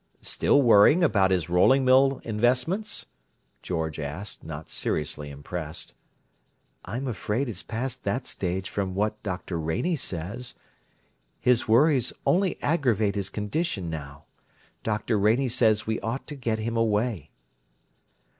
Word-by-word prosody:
"Still 140 - +3
worrying 120 - +6
over 105 - +4
his 90 -5 +1
rolling 130 +10 +4
mills 135 +1 +4
investments?" 125 - 0 0.6
George 80 -3 -3
asked, 75 +8 -6
not 80 0 -7
seriously 75 -1 -3
impressed. 75 +3 -7 0.9
"I'm 130 +4 -4
afraid 115 +3 -2
it's 105 -6 -4
past 125 +3 -4
that 130 +1 -1
stage 95 -4 -3
from 95 -2 -3
what 105 +2 -1
Dr. 90 -3 -4
Rainey 80 - 0
says. 105 - -5 0.8
His 125 -2 +2
worries 130 +2 +4
only 185 +1 +2
aggravate 120 - +2
his 100 -2 -2
condition 105 - -2
now. 70 -2 -7 0.6
Dr. 105 0 -1
Rainey 115 +6 +3
says 110 -3 +2
we 110 +1 -1
ought 115 +4 -4
to 150 - -5
get 115 -5 -1
him 115 +2 -3
away." 110 - 0
110 Hz, 125 wpm, -26 LUFS, 90-125 Hz, 0.9 s, worrying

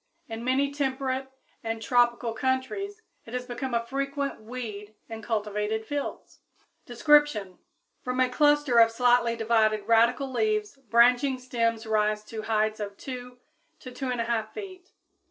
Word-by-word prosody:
In 225 0 -6
many 270 +3 +1
temperate 265 -1 -2 0.4
and 225 0 -3
tropical 240 0 +2
countries 265 - -2 0.2
it 235 - -6
has 250 0 -3
become 250 0 -4
a 230 0 0
frequent 275 0 -3
weed 215 -3 -7
in 225 -1 -7
cultivated 210 0 -2
fields. 285 +3 -5 0.5
Description. 240 - +3 0.4
From 250 0 -3
a 255 - +4
cluster 290 -1 +3
of 230 0 +7
slightly 240 0 +3
divided 220 -2 +1
radical 235 +4 +3
leaves 425 - 0
branching 245 +4 +4
stems 230 -3 -1
rise 215 -1 +1
to 220 0 -7
heights 215 0 0
of 200 -1 -5
2 250 -1 -8 0.4
to 255 - -9
2 265 +2 -6
1/2 230 -3 -1
feet. 375 -3 -9
245 Hz, 135 wpm, -27 LUFS, 225-265 Hz, 0.5 s, of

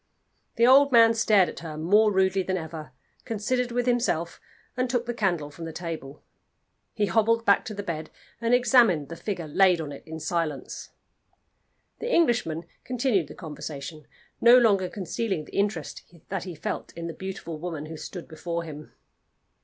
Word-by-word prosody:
The 235 - +4
old 275 +3 +6
man 230 -2 +7
stared 215 -4 +4
at - - -7
her 160 -2 -7
more 205 +7 +4
rudely 190 0 +2
than 185 0 -1
ever, 160 -4 -7 0.3
considered 240 +3 -1
with 245 0 0
himself, 235 -9 0 0.3
and 255 0 -1
took 245 -1 0
the 240 - -3
candle 175 -10 -1
from 165 +3 -8
the 165 - -5
table. 160 -4 -7 0.7
He 210 -3 +2
hobbled 225 +4 +2
back 200 - +4
to 215 - -6
the 205 - -5
bed 160 -4 -4 0.3
and 230 0 0
examined 240 - +4
the 165 - -6
figure 175 -3 -4
laid 180 +3 +4
on 150 -3 -5
it 140 - -9
in 160 0 -6
silence. 160 -5 -3 1.1
The 475 - -3
Englishman 235 - +2 0.2
continued 240 - 0
the - - -11
conversation, 150 -1 -8 0.3
no 240 +1 +8
longer 200 -6 +3
concealing 190 -3 -3
the - - -13
interest 200 -6 -2 0.3
that 190 -2 -3
he 180 -3 -7
felt 150 - -4
in 170 0 -7
the 165 - -4
beautiful 175 -3 -6
woman 160 -3 -5
who 160 +1 -8
stood 175 +2 -8
before 170 +1 -4
him. 150 -2 -10
185 Hz, 170 wpm, -26 LUFS, 160-230 Hz, 1.1 s, no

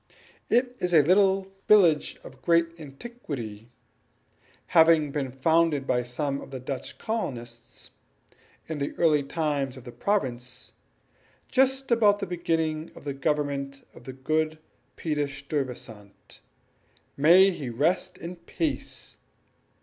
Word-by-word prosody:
It 245 +1 +2
is 180 -1 +1
a 150 - +7
little 195 +3 +3 0.2
village 175 -8 +4
of 130 0 -13
great 170 -1 +3
antiquity, 135 - -8 1.0
having 160 -3 +5
been 140 -3 -2
founded 155 +1 +2
by 125 -2 +1
some 140 +3 -3
of - - -10
the 135 -1 -6
Dutch 130 +1 -6
colonists 120 - -5 0.8
in 160 -2 -4
the 140 - -3
early 155 -3 +4
time 145 -1 -1
of 130 -1 -12
the 125 - -9
province, 125 - -2 0.8
just 265 0 +2
about 210 -3 +5
the 200 - -3
beginning 165 -3 -1
of - - -12
the 140 -1 -3
government 140 -1 -2
of 120 - -15
the 130 - -7
good 155 +4 -1 0.4
Peter 150 -3 -1
Stuyvesant 130 -7 -6 0.8
(may 175 +7 +6
he 145 -8 -5
rest 165 +9 0
in 175 +1 -7
peace!) 290 - -4
150 Hz, 125 wpm, -27 LUFS, 135-175 Hz, 1.0 s, a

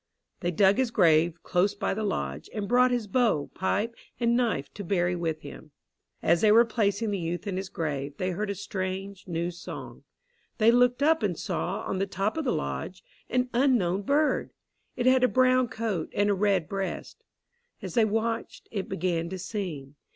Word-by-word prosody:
They 175 - -1
dug 190 +5 +4
his 260 -2 +2
grave 170 -5 +3
close 195 +3 +1
by 200 - -1
the 215 +2 -3
lodge, 70 - -3
and 205 -2 -2
brought 250 +2 +4
his 245 -3 0
bow, 210 - +1
pipe, 210 +4 -1 0.3
and 235 -1 +2
knife 230 - 0
to 205 - -7
bury 180 -1 +1
with 165 -2 -2
him. 65 -1 -10 0.5
As 170 - +3
they 215 - +5
were 230 +2 +7
placing 215 -1 0
the 200 - -1
youth 175 +3 -3
in 200 -3 -3
his 190 0 -4
grave, 145 -4 -3
they 185 0 -1
heard 205 +4 -3
a 200 - -2
strange, 195 0 -5
new 170 0 -2
song. 175 - -9 0.5
They 225 +1 +5
looked 245 +2 +3
up 320 +2 +4
and - - 0
saw, - - -2
on 190 - -2
the 195 - 0
top 195 +2 -1
of 320 -2 -2
the - - +2
lodge, 70 - -4 0.3
an 250 0 0
unknown 235 -8 +2
bird. 290 +8 +1 0.5
It 245 - -2
had 255 0 +5
a - - +7
brown 255 0 +3
coat 220 -8 -3
and 205 0 +3
a - - +3
red 195 -4 +1
breast. 195 -1 -5 0.6
As - - -5
they 235 - +4
watched, 225 +2 -2
it 200 -4 -4
began 170 -3 -1
to 190 - -5
sing. 175 -8 -5
200 Hz, 190 wpm, -27 LUFS, 175-235 Hz, 0.6 s, were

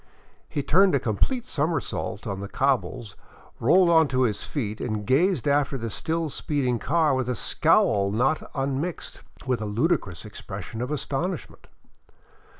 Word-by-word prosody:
He 145 - -2
turned 185 +4 +4
a - - +3
complete 225 - -1
somersault 155 - -2
on 100 -1 -3
the 100 - -5
cobbles, 125 -3 -1 0.4
rolled 175 +8 +5
on 160 -2 +5
to 130 -1 +1
his 105 -4 0
feet, 110 -7 -4
and 110 -4 -3
gazed 160 - +2
after 140 -1 +2
the 115 -2 -4
still 165 +8 -2
speeding 130 -6 -1
car 155 +1 +2
with 130 -1 -1
a 125 - 0
scowl 100 -1 +2
not 125 +9 0
unmixed 140 +5 -3 0.2
with 125 -4 0
a 105 - -3
ludicrous 105 - -1
expression 105 +1 -7
of 125 - -3
astonishment. 150 +4 -4
135 Hz, 150 wpm, -25 LUFS, 110-160 Hz, 0.4 s, rolled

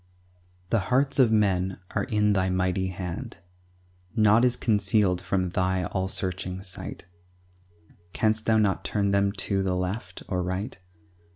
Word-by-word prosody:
The 115 - +3
hearts 135 +2 +2
of 125 -4 +5
men 95 -4 +1
are - - -1
in 105 -4 +2
Thy 95 -1 +1
mighty 95 0 0
hand; 90 -3 -6 0.8
Naught 110 +1 +5
is 125 - +2
concealed 100 -4 +1
from 95 -1 -1
Thy 95 0 0
all 95 -1 -2
searching 95 0 -1
sight; 90 -3 -8 1.1
Canst 110 +2 0
Thou 110 -1 +4
not 105 -3 +1
turn 100 -2 0
them 100 0 +2
to 100 0 -1
the 95 -1 0
left 90 +6 -4
or 90 -2 -1
right? 95 +6 -4
95 Hz, 145 wpm, -26 LUFS, 95-110 Hz, 1.1 s, of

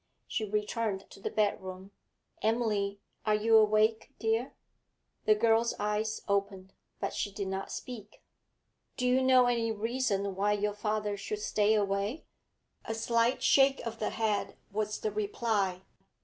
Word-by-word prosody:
She 220 - -2
returned 210 -1 -1
to - - -12
the - - -3
bedroom. 190 -2 -2 0.5
'Emily, 210 -3 0 0.2
are 215 -1 +2
you 225 +2 +3
awake, 215 +1 +3
dear?' 225 +3 -1 0.7
The 215 - +5
girl's 225 +1 +3
eyes 210 +1 -1
opened, 200 -1 -1 0.3
but - - -2
she 205 - -2
did 200 0 -4
not 190 0 -4
speak. 215 -4 -8 0.7
'Do 250 - -1
you 250 +1 +4
know 260 -1 +6
any 235 -2 +1
reason 215 -3 -1
why 205 +2 +2
your 210 0 0
father 210 0 -2
should 210 +1 -4
stay 215 0 +2
away?' 200 +6 -1 0.6
A 225 - -4
slight 230 +2 +1
shake 270 0 +5
of 230 -1 -5
the 215 - 0
head 215 -2 -1
was 215 +1 -2
the 215 - -1
reply. 205 -3 -1
215 Hz, 145 wpm, -31 LUFS, 200-225 Hz, 0.7 s, know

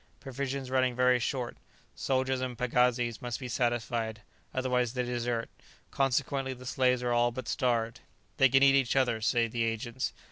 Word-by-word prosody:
Provisions 135 -1 -4
running 130 -1 +2
very 125 0 +4
short; 125 0 -3 0.4
soldiers 130 0 0
and 125 -2 -4
pagazis 125 -1 +1
must 120 -1 -4
be 130 - -5
satisfied, 120 -3 -1 0.3
otherwise 125 -2 0
they 125 -1 -1
desert; 120 -1 -2 0.4
consequently 135 0 0
the 125 0 -12
slaves 125 -1 +1
are 120 - 0
all 120 0 +3
but 120 0 -7
starved. 115 -3 0 0.4
"They 135 - +6
can 135 +2 +5
eat 135 0 +7
each 135 -2 +2
other," 125 -4 +2
say 115 +1 +2
the 115 +1 -3
agents. 115 +2 -2
125 Hz, 165 wpm, -30 LUFS, 120-130 Hz, 0.4 s, eat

